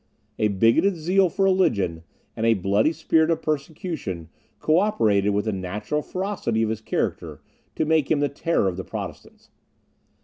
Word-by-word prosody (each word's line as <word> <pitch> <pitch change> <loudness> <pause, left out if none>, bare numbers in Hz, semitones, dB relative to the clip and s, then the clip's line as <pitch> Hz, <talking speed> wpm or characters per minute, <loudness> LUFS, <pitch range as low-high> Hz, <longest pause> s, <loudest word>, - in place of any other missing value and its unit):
A 105 - +3
bigoted 115 - +3
zeal 180 +3 +2
for 195 +3 0
religion, 110 - +1 0.3
and 110 - -4
a 115 - +5
bloody 100 - +2
spirit 160 0 +2
of 165 - 0
persecution, 150 - -4 0.3
co 155 +2 +3
operated, 105 - +2
with 105 +1 0
the 110 - 0
natural 105 +9 -3
ferocity 180 - -2
of 110 - 0
his 110 0 -4
character, - - -3 0.4
to 160 - 0
make 155 -2 +2
him 155 - +2
the 145 - +2
terror 145 - 0
of 90 -1 -2
the 95 - -4
Protestants. - - -8
140 Hz, 165 wpm, -24 LUFS, 105-165 Hz, 0.4 s, a